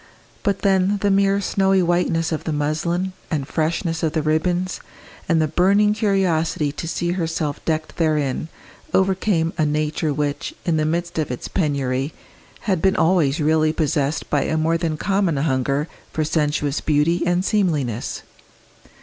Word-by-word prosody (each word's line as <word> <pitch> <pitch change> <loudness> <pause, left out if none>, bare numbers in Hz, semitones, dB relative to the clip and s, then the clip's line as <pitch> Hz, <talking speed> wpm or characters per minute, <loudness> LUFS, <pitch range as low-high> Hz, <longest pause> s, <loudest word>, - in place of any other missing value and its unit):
But 200 -1 -1
then 195 0 +3
the 200 - +3
mere 195 0 +3
snowy 195 -1 +2
whiteness 170 -1 +1
of 160 - -2
the 160 - -1
muslin 160 +5 -1 0.2
and 145 -5 -2
freshness 165 +1 -1
of 160 -2 0
the 155 - 0
ribbons, 175 +4 0 0.5
and 165 -1 +3
the 155 - +2
burning 200 +6 +3
curiosity 180 -8 +1
to 160 +3 -6
see 170 +1 -1
herself 165 -4 -2
decked 155 -1 -2
therein, 155 -3 0 0.5
overcame 190 -3 +1
a - - +4
nature 150 +1 0
which, 145 0 -2
in 165 -2 +1
the 155 - +1
midst 170 +1 -2
of 155 - -1
its 125 - -5
penury, 140 -4 -1 0.5
had 185 -6 0
been 190 0 +3
always 165 -4 +2
really 155 0 +3
possessed 150 -2 0
by 145 - +3
a 160 - 0
more 160 +1 +1
than 165 -2 -1
common 195 -4 +1
hunger 140 +1 0 0.2
for 155 - -1
sensuous 150 -2 0
beauty 155 +3 +2
and 175 +1 +1
seemliness. 150 - -1
160 Hz, 155 wpm, -21 LUFS, 150-180 Hz, 0.5 s, a